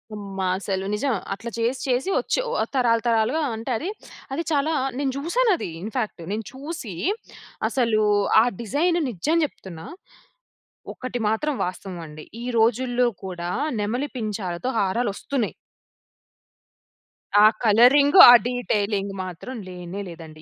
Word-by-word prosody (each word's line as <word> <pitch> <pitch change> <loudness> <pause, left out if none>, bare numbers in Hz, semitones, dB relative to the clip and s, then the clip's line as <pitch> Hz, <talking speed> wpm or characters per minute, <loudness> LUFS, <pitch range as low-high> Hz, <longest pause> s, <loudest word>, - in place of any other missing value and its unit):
అమ్మా! 195 -2 -4
అసలు 195 -1 -3
నిజం. 255 +5 0 0.2
అట్లా 225 +4 -6
చేసి 235 +3 -1
చేసి 255 +7 0
వచ్చి - - -1
ఓహ్! - - 0
తరాలు 235 -3 +3
తరాలుగా 230 +7 +2
అంటే 225 +4 -5
అది, 335 - -4 0.4
అది 325 +5 -2
చాలా 300 +1 +1 0.3
నేను 275 -1 0
చూశానది 355 - +1
ఇన్‌ఫాక్ట్. 215 -2 -4
నేను 215 +1 -3
చూసి 275 - -6 0.8
అసలు 230 -4 +1 0.4
ఆ - - +4 0.2
డిజైన్ 330 - +1
నిజం 250 - 0
చెప్తున్నా 175 - -10 1.1
ఒక్కటి 255 -1 -5
మాత్రం 285 +8 0
వాస్తవమండి. 170 -4 -7 0.2
ఈ - - -5
రోజుల్లో 245 +2 +2 0.2
కూడా 175 -2 -5 0.3
నెమలి 245 +7 -1
పించాలతో 210 -2 -3
హారాలొస్తున్నయి. 215 +4 -1 1.9
ఆ - - +8 0.2
కలరింగ్ 255 - +5
ఆ - - +12 0.2
డీటెయిలింగ్ 205 -5 -1
మాత్రం 185 +8 -7
లేనే 180 +1 -7
లేదండి. 160 -2 -11
225 Hz, 120 wpm, -23 LUFS, 195-265 Hz, 1.9 s, ఆ